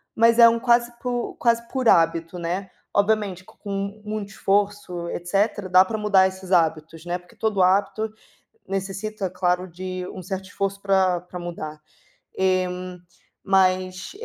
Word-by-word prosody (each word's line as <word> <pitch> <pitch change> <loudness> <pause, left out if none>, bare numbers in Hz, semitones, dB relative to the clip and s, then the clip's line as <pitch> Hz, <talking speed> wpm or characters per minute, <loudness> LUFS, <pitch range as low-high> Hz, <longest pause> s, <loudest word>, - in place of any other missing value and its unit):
mas 230 +1 +4
é 235 - +10
um 230 0 +3
quase 235 0 +3
por 245 -1 -3
quase 235 -1 +2
por 260 -3 +1
hábito, 165 +1 +2
né. 180 +3 -3 0.3
Obviamente 200 -3 +1
com 200 +2 -6
muito 210 -1 -4
esforço, 195 -4 -1
etc 195 +2 -1
dá 185 +1 +7
para 220 +3 -4
mudar 205 -3 +4
esses 190 0 -6
hábitos, 160 -1 +1
né, 175 +1 -2
porque 180 0 -20
todo 215 -4 0
hábito 200 +4 +2 0.6
necessita 195 +1 -3
claro 180 0 0
de 185 +1 -5
um 190 - -7
certo 190 +1 -5
esforço 200 0 -3
pra 190 -3 +2
pra 180 0 -9
mudar, 155 -3 -6 0.6
eh, 185 -1 +2 0.8
mas 185 -1 +1
190 Hz, 145 wpm, -23 LUFS, 180-205 Hz, 0.8 s, é